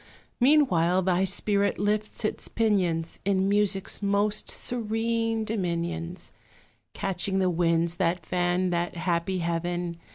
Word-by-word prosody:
Meanwhile 190 - +4
thy 185 +1 +2
spirit 200 +1 +1
lifts 210 +2 -1
its - - -2
pinions 180 -7 0
In 195 -1 +1
music's 200 -1 0
most 205 +1 0
serene 225 -1 -1
dominions; 175 -4 -3 0.6
Catching 190 0 -2
the 185 -1 +2
winds 170 0 +1
that 175 -2 0
fan 180 +1 0
that 175 0 -1
happy 175 +1 -1
heaven. 170 0 -2
185 Hz, 110 wpm, -27 LUFS, 175-210 Hz, 0.6 s, Meanwhile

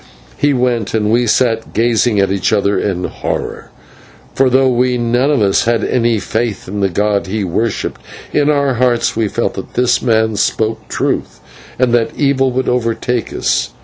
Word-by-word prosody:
He 145 - +1
went, 125 -5 0
and 105 -1 +1
we 120 +1 +2
sat 115 0 +1
gazing 115 -1 +2
at 100 -1 +2
each 100 +2 0
other 100 -1 +1
in 95 -3 -2
horror, - - -4 0.6
for 135 -1 +3
though 130 +1 +3
we 125 0 +1
none 120 +3 +1
of 140 -7 +2
us 100 -1 +2
had 115 -2 +1
any 120 -2 +1
faith 110 +1 -3
in 100 +2 -4
the 100 -1 +1
god 100 +2 0
he 105 +2 -2
worshipped, 100 +5 -2 0.3
in 145 0 +2
our 140 -2 +2
hearts 120 -1 +1
we 110 -1 0
felt 105 +4 -2
that 95 - -8
this 125 0 +2
man 110 -3 +1
spoke 110 +1 -1
truth, - - -2 0.4
and 125 -1 +1
that 115 -2 +1
evil 135 -2 +2
would 130 +1 -2
overtake 120 -1 -1
us. - - -1
115 Hz, 180 wpm, -15 LUFS, 105-125 Hz, 0.6 s, for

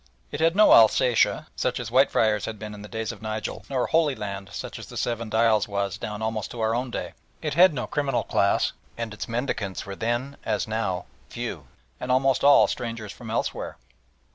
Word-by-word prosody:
It - - -4
had 165 +2 +3
no 215 +1 +6
Alsatia, 115 +1 +5
such - - -1
as - - -5
Whitefriars 105 -2 +3
had 110 -1 -5
been 105 0 -7
in 105 - -9
the 105 - -9
days 110 0 -3
of 115 - -12
Nigel, 110 0 -4
nor 130 -3 0
"Holy 160 -4 +2
Land," 100 -3 -6
such - - -6
as - - -9
the - - -9
Seven 115 -2 -2
Dials 110 -1 +3
was 100 0 -2
down 105 0 -5
almost 110 -1 -2
to 120 - -8
our 110 0 +1
own 125 +2 -1
day. - - -5 0.3
It - - -1
had 180 +4 +7
no 135 -5 -3
criminal 140 -4 -1
class, 100 - +1 0.2
and 115 -2 -4
its 105 - -6
mendicants 115 -5 -3
were 100 0 -6
then 120 +6 -2
as - - -1
now 95 -5 -2 0.2
few, - - -5 0.3
and 125 - -3
almost 135 0 +2
all 140 0 +7
strangers 115 -3 -4
from 115 0 -10
elsewhere. 115 - -3
110 Hz, 200 wpm, -25 LUFS, 105-125 Hz, 0.3 s, had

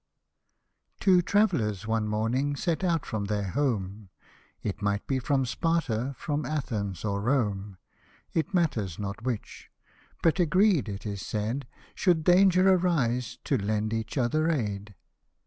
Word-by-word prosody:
Two 185 -2 +5
trav'llers 140 - +1
one 110 -1 0
morning 120 +7 0
set 170 +4 -1
out 170 -4 +1
from 110 -3 -3
their 100 -2 -2
home, 105 -8 -2 0.5
It 105 0 -3
might 100 0 0
be 135 -1 0
from 135 +1 +1
Sparta, 135 -3 -1
from 150 0 -2
Athens, 110 - -3
or 100 -1 -1
Rome; 105 -6 0 0.6
It 165 +4 0
matters 120 - 0
not 100 +1 -5
which, 120 -3 -5 0.5
but 165 +2 +3
agreed, 180 - +3
it 100 +1 -6
is 100 -2 -4
said, 110 +6 -3 0.3
Should 175 -4 +2
.danger 185 +1 +5
arise, 130 -10 0
to 135 - +1
lend 105 +2 -1
each 115 +4 -3
other 155 +6 +2
aid. 105 - -2
120 Hz, 135 wpm, -28 LUFS, 105-160 Hz, 0.6 s, Two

